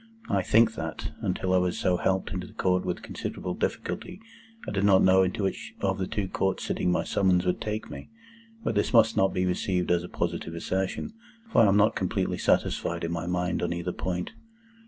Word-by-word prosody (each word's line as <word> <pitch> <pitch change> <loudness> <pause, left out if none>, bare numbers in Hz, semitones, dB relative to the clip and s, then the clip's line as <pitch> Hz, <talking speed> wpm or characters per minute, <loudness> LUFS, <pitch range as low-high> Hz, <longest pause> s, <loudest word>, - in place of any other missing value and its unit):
I - - +2
think 110 0 +4
that, - - -5
until 95 0 -1
I 95 - +5
was 90 -1 0
so 90 -1 +1
helped 95 +1 0
into 90 -1 -4
the - - -15
Old - - -27
Court 90 0 +1
with 90 -1 -3
considerable - - -5
difficulty, 180 +1 -3 0.5
I - - -3
did 100 -1 0
not 100 -2 +5
know 95 0 +6
into 95 +3 0
which 95 - -3
of 95 0 0
the 95 - -1
two 100 -2 -2
Courts 95 0 -1
sitting 90 - 0
my 90 - +1
summons 90 -2 +2
would 90 - 0
take 105 0 -3
me. - - -9 0.5
But - - 0
this 105 +4 0
must 115 -1 +5
not 95 - +3
be 90 - 0
received 90 0 0
as 85 -1 +2
a 90 - -8
positive 85 -1 -3
assertion, 95 - -2 0.4
for - - +5
I 110 - +6
am 100 +1 +4
not 105 +2 +4
completely 95 0 -1
satisfied 85 0 +1
in 85 - -2
my 85 0 -3
mind 90 0 -1
on - - 0
either 85 +1 -3
point. 90 -1 -3
95 Hz, 215 wpm, -27 LUFS, 90-100 Hz, 0.5 s, know